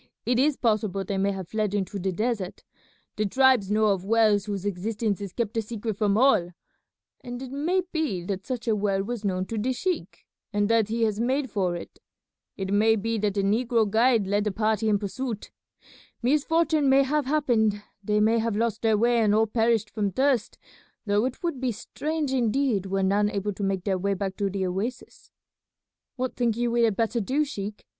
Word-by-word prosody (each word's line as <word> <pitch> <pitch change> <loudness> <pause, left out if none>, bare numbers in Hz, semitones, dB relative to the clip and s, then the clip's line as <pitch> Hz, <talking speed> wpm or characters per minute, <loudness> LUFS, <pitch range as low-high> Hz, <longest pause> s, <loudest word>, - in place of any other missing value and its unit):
It 245 0 +2
is 285 +1 +2
possible 215 -4 0
they 195 +1 -2
may 195 +1 +2
have 190 -3 -6
fled 215 -2 -1
into 200 0 -2
the 190 +1 -1
desert. 210 -1 -3 0.5
The 215 - +1
tribes 260 -3 +3
know 215 +1 +2
of 195 -3 0
wells 210 -1 +3
whose 200 -2 -4
existence 205 +2 -2
is 200 -2 -5
kept 225 +1 -3
a - - +2
secret 220 0 -4
from 205 0 +1
all, 215 -9 +3 0.7
and 245 0 -6
it 260 -1 -7
may 335 +7 0
be 295 - -1
that 190 +1 -5
such 250 -2 -4
a 220 - +3
well 200 -2 0
was 230 +1 -5
known 185 -2 -1
to 225 +2 -4
the 255 +5 0
sheik 360 +8 -3 0.3
and 205 0 +1
that 225 -2 +3
he 230 +1 -1
has 215 -2 0
made 260 +2 0
for 185 -4 0
it. 170 - -9 0.6
It 195 0 -3
may 220 +2 +4
be 225 +1 -2
that 205 -1 0
the 200 - +1
negro 225 +2 +2
guide 225 +1 +3
led 205 +2 +1
the 210 - 0
party 215 +1 0
in 205 - +3
pursuit. 215 +2 -5 0.7
Misfortune 305 +2 +2
may 270 +1 +5
have 290 0 0
happened; 230 -8 +1 0.2
they 210 +1 +1
may 225 +2 +3
have 225 -1 -1
lost 225 0 -1
their 220 -2 +3
way 235 +2 +3
and 210 -2 +3
all 220 +1 +4
perished 225 -1 +1
from 210 -2 -1
thirst, 260 +1 +1 0.5
though 205 +2 +2
it 255 +5 -5
would 335 -7 -2
be 255 -2 0
strange 295 +6 -3
indeed 240 -4 +1
were 195 0 0
none 205 +2 +2
able 205 0 -2
to 195 - -9
make 195 -2 -1
their 190 -2 0
way 200 +2 0
back 190 0 -3
to 200 -1 0
the 190 0 -2
oasis." 205 +8 -5 0.9
"What 255 -1 -3
think 235 -3 0
you 240 0 0
we 235 0 +3
had 220 -3 +1
better 230 +1 0
do, 275 +9 0
sheik? 210 -6 -6
220 Hz, 205 wpm, -26 LUFS, 200-245 Hz, 0.9 s, may